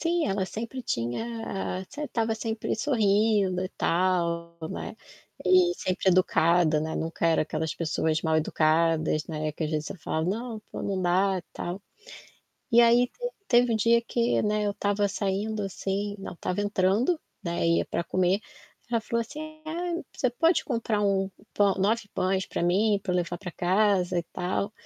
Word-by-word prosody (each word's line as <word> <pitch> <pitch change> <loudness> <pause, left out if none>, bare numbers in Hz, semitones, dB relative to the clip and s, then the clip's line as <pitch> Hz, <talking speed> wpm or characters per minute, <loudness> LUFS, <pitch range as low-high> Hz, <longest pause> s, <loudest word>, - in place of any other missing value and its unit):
Sim, 340 0 +1
ela 195 -1 0
sempre 230 +6 -5
tinha 195 - -3
sem 295 +1 -5
estava 225 -5 -1
sempre 220 0 -3
sorrindo 210 -6 +2
e - - -3
tal, 170 -1 0
né, - - -6 0.5
e 365 -1 +5
sempre 185 - -1
educada, 170 -3 +4
né, 160 +1 -3
nunca 165 +1 -1
era 165 - +3
aquelas 160 +1 -3
pessoas 160 -1 0
mal 160 -1 +2
educadas, 155 0 +2
né, 155 -1 -3
que 155 +2 -4
às 155 - -3
vezes 155 0 -1
você - - -6
falava: 160 +1 -2
"Não, 225 +1 -4
pô - - -6
não 195 -2 -1
dá 185 +2 +2
e - - -8
tal". 180 +3 -5 0.9
E 235 - +8
aí 240 +1 +6
te - - -6 0.2
teve 240 -1 +4
um - - +2
dia 235 +2 +4
que, 235 +1 +1
né, 210 0 +1
eu 205 - 0
estava 205 0 0
saindo 205 +2 -2
assim 200 +1 -3
não 195 - -7
estava 180 +3 -3
entrando, 205 - +2 0.3
né, 170 -1 -1
ia 170 - +3
pra - - -2
comer, 185 +3 +1 0.5
ela 230 -1 +2
falou 235 +2 -1
assim: 310 +6 -7
"Ai 340 +2 -3
você 255 - +1
pode 330 +8 +2
comprar 230 -5 -1
1 195 -1 +1 0.2
pão 200 -1 +3
9 210 +2 +1
pães 190 0 0
pra - - -4
mim 200 +5 +3
pra 185 - -1
eu - - +1
levar 175 0 -2
pra 180 -2 -7
casa 185 0 +2
e - - 0
tal?" 180 +2 -1
Eu 205 - -9
195 Hz, 175 wpm, -27 LUFS, 175-230 Hz, 0.9 s, E